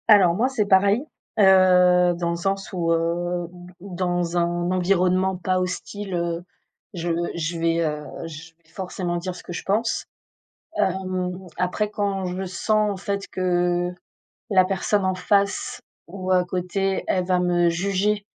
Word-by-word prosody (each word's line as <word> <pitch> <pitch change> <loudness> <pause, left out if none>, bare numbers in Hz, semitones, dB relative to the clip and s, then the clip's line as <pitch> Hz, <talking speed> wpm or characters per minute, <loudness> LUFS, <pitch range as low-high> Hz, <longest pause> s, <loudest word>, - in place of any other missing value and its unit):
Alors 200 -6 +7
moi, 240 +7 +2
c'est 240 -6 0
pareil, 200 +5 +4 0.4
heu, 180 -2 +6
dans 170 -1 -1
le - - -1
sens 195 +3 -2
où, 170 -2 0
heu, 170 +1 0
où 175 0 -13
d 180 - -15
où 185 0 -9
dans 175 -1 -1
un 175 +1 0
environnement 185 0 +2
pas 185 +1 0
hostile, 185 +2 -4
heu, 170 0 -2 0.5
je 175 -1 -3 0.3
je 165 0 -3
vais, 165 0 +1
heu, 150 -1 -3 0.2
je 160 0 -10
vais 160 - -28
forcément 180 0 -4
dire 180 +1 -4
ce - - -11
que 175 - -7
je - - -5
pense. 220 +4 0 0.7
Hem, 185 -1 -1
après, 185 +4 0
quand 200 -2 -2
je 180 +1 -3
sens, 210 +3 +1
en 200 - -4
fait, 200 +1 -3
que 175 -1 0 0.6
la 190 -2 +5
personne 195 +1 0
en 185 0 +1
face 200 +2 0 0.3
ou 185 +1 -6
à 180 -1 +4
côté, 185 +2 -1
elle 185 -1 +1
va 180 -1 +2
me 175 -1 +3
juger, 200 +4 0
185 Hz, 165 wpm, -23 LUFS, 175-195 Hz, 0.7 s, Alors